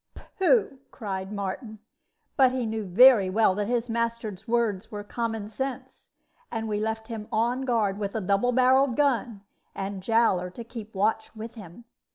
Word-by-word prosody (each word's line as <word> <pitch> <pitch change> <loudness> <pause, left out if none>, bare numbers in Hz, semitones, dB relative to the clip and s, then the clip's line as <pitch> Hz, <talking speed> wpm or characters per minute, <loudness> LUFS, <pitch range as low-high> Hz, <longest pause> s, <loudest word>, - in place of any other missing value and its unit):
"Pooh!" 380 - +3
cried 195 -4 -5
Martin; 210 +2 -5 0.6
but 260 -3 +5
he 255 -2 -2
knew 220 -1 -3
very 210 +1 +6
well 210 0 +3
that 205 +1 -2
his 240 0 0
master's 230 -3 -3
words 225 -3 0
were 205 -1 -6
common 225 -1 -3
sense; 265 +4 -6 0.4
and 225 0 -3
we 210 -1 -1
left 220 +1 -3
him 220 -2 -6
on 240 +4 0
guard 215 -5 0
with 200 0 -3
a 220 - -1
double 200 +6 +1
barreled 255 +1 +4
gun, 245 -7 0 0.3
and 195 0 -4
Jowler 195 -4 +2
to 235 - -6
keep 225 -2 -10
watch 220 +3 0
with 220 +1 -7
him. 205 0 -12
225 Hz, 165 wpm, -26 LUFS, 205-240 Hz, 0.6 s, very